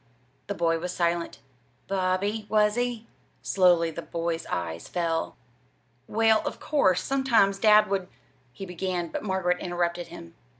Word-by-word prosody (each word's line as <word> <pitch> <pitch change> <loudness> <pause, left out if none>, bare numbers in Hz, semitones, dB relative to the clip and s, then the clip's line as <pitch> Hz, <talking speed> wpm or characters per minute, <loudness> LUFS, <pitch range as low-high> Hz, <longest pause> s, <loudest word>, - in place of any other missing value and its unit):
The 200 - -3
boy 165 -1 +1
was 180 +2 -4
silent. 170 -1 -1 0.5
"Bobby, 195 +3 -1
was 210 0 +3
he?" 245 -1 -2 0.4
Slowly 175 -3 +3
the 165 - -6
boy's 165 -1 -3
eyes 85 -2 -4
fell. 165 -2 -2 0.7
"Well, 220 0 +3
of - - -5
course, 190 - +2
sometimes 235 -8 +2
dad 210 0 +6
would" 195 -2 -1 0.4
he 195 +10 -8
began; 180 -1 -3
but - - -4
Margaret 190 -3 0
interrupted 175 0 -2
him. 85 0 -11
185 Hz, 135 wpm, -26 LUFS, 170-210 Hz, 0.7 s, dad